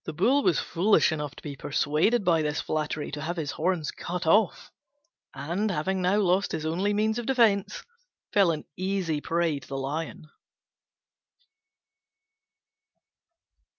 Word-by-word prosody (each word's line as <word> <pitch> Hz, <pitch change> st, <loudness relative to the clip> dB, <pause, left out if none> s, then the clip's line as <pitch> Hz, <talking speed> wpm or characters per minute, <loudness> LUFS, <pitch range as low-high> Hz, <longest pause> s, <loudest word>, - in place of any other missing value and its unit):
The -, -, -6 dB
Bull 265 Hz, -, +3 dB
was 175 Hz, -, +2 dB
foolish 190 Hz, +2 st, +3 dB
enough 150 Hz, -2 st, -4 dB
to -, -, -14 dB
be 145 Hz, -2 st, -6 dB
persuaded 150 Hz, -, +1 dB
by 165 Hz, -2 st, +3 dB
this 150 Hz, -1 st, -1 dB
flattery 155 Hz, -1 st, -3 dB
to 150 Hz, 0 st, -5 dB
have 170 Hz, +4 st, -3 dB
his 155 Hz, -3 st, -2 dB
horns 170 Hz, -2 st, -1 dB
cut 175 Hz, 0 st, -5 dB
off; 205 Hz, +7 st, +2 dB, 0.6 s
and, 170 Hz, +10 st, -2 dB
having 190 Hz, +2 st, -1 dB
now 185 Hz, +3 st, +2 dB
lost 190 Hz, -1 st, +2 dB
his 155 Hz, -, -3 dB
only 180 Hz, +6 st, 0 dB
means 215 Hz, +2 st, +1 dB
of 240 Hz, -, -6 dB
defence, 225 Hz, -7 st, +2 dB, 0.5 s
fell 200 Hz, -4 st, +5 dB
an 155 Hz, -2 st, -2 dB
easy 185 Hz, -5 st, -1 dB
prey 165 Hz, -3 st, 0 dB
to 130 Hz, -, -16 dB
the 135 Hz, -, -5 dB
Lion. 150 Hz, +3 st, -4 dB
170 Hz, 145 wpm, -27 LUFS, 150-200 Hz, 0.6 s, fell